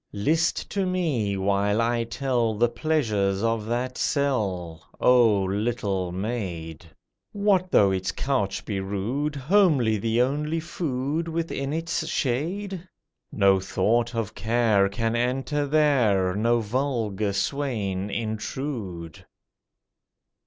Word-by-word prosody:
List 160 - 0
to 195 -2 0
me, 145 - 0
while 100 +2 +1
I 115 0 +1
tell 120 -2 0
The 120 +3 +2
pleasures 115 -8 0
of 115 -1 0
that 125 +2 -2
cell, 95 - -1 0.2
Oh, 115 -6 +5
little 100 -2 -1
maid! 90 -6 -4 0.5
What 200 -3 +2
though 100 - +5
its 95 0 -1
couch 115 -8 -1
be 100 -3 -2
rude, 110 +10 -2
Homely 140 - +3
the 115 +3 0
only 150 +5 -1
food 155 -1 -2
Within 160 -4 -3
its 165 0 -2
shade? 175 +9 -2 0.5
No 95 -1 +4
thought 115 +6 0
of 110 -2 -2
care 110 -2 +2
Can 115 +3 -1
enter 135 +4 0
there, 125 -11 +3
No 115 +3 +2
vulgar 110 -4 -1
swain 100 -4 -2
intrude! 110 - -4
115 Hz, 110 wpm, -25 LUFS, 100-140 Hz, 0.5 s, Oh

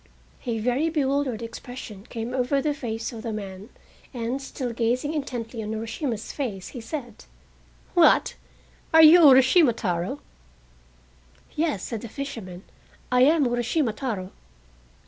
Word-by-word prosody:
A 235 -2 0
very 250 +8 +1
bewildered 275 -6 0
expression 230 -2 -9
came 230 +1 -5
over 260 +2 +1
the 295 +2 0
face 230 -4 -4
of 225 - -7
the 230 - -4
man, 200 0 -7 0.5
and, 240 +3 -2
still 260 -3 -5
gazing 245 +6 0
intently 245 -6 -4
on 215 0 -4
Urashima's 225 +1 -4
face, 210 -10 -4
he 245 - -8
said: 240 -2 -7 0.7
"What? - - +5 0.6
Are 320 - +9
you 320 +3 +9
Urashima 265 +1 +7
Taro?" 175 -5 -2 1.3
"Yes," 305 - -1
said 230 -3 -4
the 235 - -8
fisherman, 215 -10 -7 0.5
"I 250 0 +4
am 305 0 +4
Urashima 240 +1 0
Taro!" 205 -7 -4
245 Hz, 130 wpm, -25 LUFS, 220-275 Hz, 1.3 s, Are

